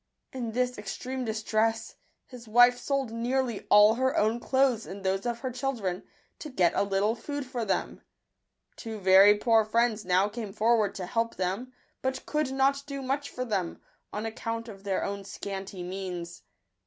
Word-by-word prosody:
In 240 -4 -4
this 250 -1 0
extreme 255 +6 -4
distress, 220 0 -1 0.3
his 245 -3 -12
wife 245 +2 +6
sold 275 -4 -1
nearly 240 0 -1
all 210 +1 +7
her 260 +3 0
own 220 +3 +2
clothes 260 -3 +1
and 195 +1 -8
those 190 +4 0
of 235 -1 -3
her 260 -1 -3
children, 235 -8 -2 0.4
to 305 - -7
get 180 - +2
a - - +1
little 200 +2 +1
food 285 +4 -5
for 250 -2 -4
them. 195 -3 -2 0.7
Two 225 -1 -6
very 195 +1 +7
poor 225 0 +4
friends 225 0 +1
now 185 +1 +3
came 210 -2 -6
forward 220 -2 +2
to 185 - -4
help 230 +5 -1
them, 195 +8 -2 0.3
but 260 0 -2
could 300 -3 -1
not 270 +1 +2
do 275 -1 -5
much 275 +2 -2
for 255 - -4
them, 195 -7 -2 0.3
on 210 +2 -4
account 230 +1 -4
of 195 -3 -11
their 195 -2 0
own 200 0 -4
scanty 195 -1 -6
means. 180 -2 -6
225 Hz, 170 wpm, -28 LUFS, 200-250 Hz, 0.7 s, all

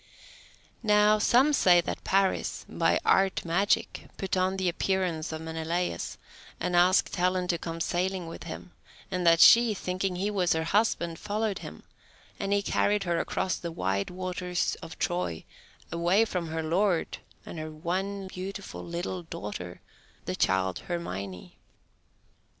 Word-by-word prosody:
Now 210 -1 +4
some 260 +7 +4
say 180 -10 +6
that 170 - -3
Paris, 195 0 0
by - - +1
art 190 -2 +3
magic, 185 +5 0
put 195 -1 -2
on 185 +1 +1
the 190 -1 0
appearance 175 -2 -1
of 160 0 -5
Menelaus, 160 +2 -3 0.4
and 180 - -1
asked 180 +2 +4
Helen 180 0 +1
to 170 - +1
come 165 0 -5
sailing 180 +2 -1
with 165 - -8
him, - - -8 0.4
and 180 -2 0
that 165 0 +6
she, 230 +1 +7
thinking 185 0 -2
he 200 +4 -1
was 185 -4 +2
her 160 0 0
husband, 170 -3 +1
followed 210 -1 -2
him, - - -10 0.6
and 195 - -2
he 200 0 +2
carried 205 0 +1
her 170 -2 0
across 190 - -1
the 170 - -5
wide 95 - -1
waters 180 0 -2
of 165 -1 -9
Troy, 175 - -2 0.5
away 175 +6 +3
from 180 -6 -3
her 160 0 -3
lord 175 +2 0 0.3
and 165 - -7
her 155 0 -5
one 190 +5 -3
beautiful 190 +2 -7
little 175 +2 -4
daughter, 100 - -7 0.4
the - - -2
child 95 -1 +1
Hermione. 100 - -6
180 Hz, 145 wpm, -28 LUFS, 165-195 Hz, 0.6 s, she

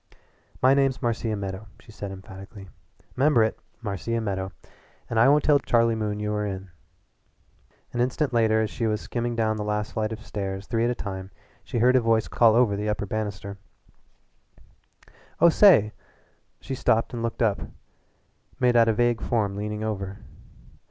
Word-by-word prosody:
"My 130 +1 +6
name's 135 -1 +2
Marcia 115 -2 -1
Meadow," 100 +1 -6
she 115 - -16
said 105 -2 -7
emphatically. 95 +1 -11 0.5
"'Member 135 -3 +4
it 110 - -1 0.2
Marcia 110 +3 -2
Meadow. 95 -3 -3 0.6
And 115 - 0
I 120 +4 +6
won't 150 +1 +4
tell 145 -2 +4
Charlie 115 -3 +2
Moon 105 -2 -2
you 105 0 -2
were 105 0 -1
in." 95 -2 -5 1.2
An 120 - 0
instant 130 +2 0
later 110 -1 +3
as 110 - -3
she 115 -2 -2
was 105 -1 0
skimming 120 0 -3
down 110 -1 0
the 105 - -3
last 105 0 -2
flight 110 0 -1
of 110 0 -7
stairs 95 -1 -4
three 115 +1 0
at - - +1
a 125 - -1
time 95 -3 -6 0.3
she - - -4
heard 125 +3 +4
a 130 - +5
voice 115 -1 +2
call 115 -2 +4
over 115 -4 +3
the 105 +1 -2
upper 105 -1 -2
banister: 100 -1 -5 1.8
"Oh, 170 - +7
say 160 - +6 0.3
" - - -41
She 135 - -6
stopped 115 -1 +1
and 120 - -4
looked 115 +1 -2
up 105 -3 +1 1.0
made 125 -1 +3
out 115 -1 +6
a - - +3
vague 120 0 +1
form 105 -4 0
leaning 105 +1 -4
over. 100 -3 -4
110 Hz, 175 wpm, -25 LUFS, 105-120 Hz, 1.8 s, Oh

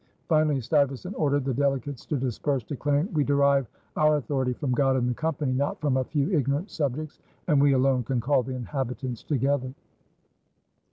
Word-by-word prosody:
Finally 155 -3 +3
Stuyvesant 140 - 0
ordered 145 -4 +1
the 135 - 0
delegates 135 0 -1
to 150 - -1
disperse, 130 +1 -1
declaring: 145 - -1
"We 150 -2 +2
derive 140 -2 +3 0.3
our 155 0 +4
authority 135 -2 -1
from 130 +1 -3
God 135 +1 +2
and 125 -2 +1
the 125 - 0
Company, 150 -1 -1
not 140 +3 -1
from 140 -4 +1
a 130 - +1
few 145 +5 -1
ignorant 150 - 0
subjects, 150 0 -3 0.3
and 150 -4 +4
we 140 -1 +5
alone 130 -1 +3
can 125 +1 -1
call 130 +3 +2
the 130 +1 -5
inhabitants 125 -1 -4
together." 135 -2 0
140 Hz, 170 wpm, -26 LUFS, 130-145 Hz, 0.3 s, we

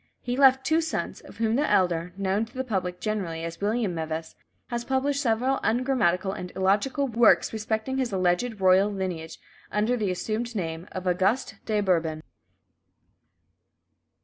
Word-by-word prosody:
He 245 0 -3
left 265 -1 +5
two 320 +1 +3
sons, 320 -1 -3
of - - -14
whom 225 0 +1
the 295 +4 +1
elder, 175 -2 +2
known 195 +2 0
to 225 - -20
the 260 - -1
public 185 -7 -2
generally 185 -7 -3
as 165 +2 -6
William 210 -1 0
Meves, 160 0 -4 0.4
has 240 -1 -2
published 270 +2 0
several 255 +2 +1
ungrammatical 220 -6 +1
and 180 -2 -6
illogical 210 +9 +1
works 235 -2 +4
respecting 220 +4 -2
his 255 -2 -1
alleged 190 +4 0
royal 190 +2 +5
lineage, 180 -5 -4 0.3
under 215 +4 +1
the 215 -5 -1
assumed 220 +6 -3
name 165 -3 -4
of 185 0 -6
"Auguste 190 +8 0
de 215 -2 +1
Bourbon." 165 -5 0
210 Hz, 150 wpm, -26 LUFS, 180-245 Hz, 0.4 s, left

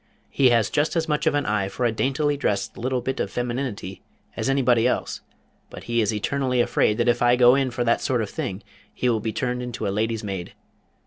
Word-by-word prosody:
He 130 -2 +4
has 115 -4 +2
just 150 +3 0
as 165 0 0
much 150 -1 0
of - - +3
an 145 -1 0
eye 100 -2 0
for 125 - -2
a 120 - +2
daintily 135 +6 0
dressed 105 -8 -2
little 125 +1 -2
bit 130 +2 -3
of - - -1
femininity 120 -6 -4 0.3
as - - -2
anybody 125 -3 +3
else, - - -2 0.5
but - - -10
he 120 0 0
is 105 - +1
eternally 125 +4 -1
afraid 105 -2 +2
that 120 0 +1
if 120 0 +2
I 120 0 +5
go 125 0 +6
in 135 -1 +1
for 120 0 -2
that 115 0 +2
sort 125 -4 0
of 105 - -5
thing 95 +3 -4 0.3
he 125 - -2
will 115 -2 +1
be 110 +1 -3
turned 125 +1 -2
into 125 -4 -4
a 100 - -1
lady's 110 +1 -1
maid. 95 -4 -5
120 Hz, 230 wpm, -24 LUFS, 110-130 Hz, 0.5 s, go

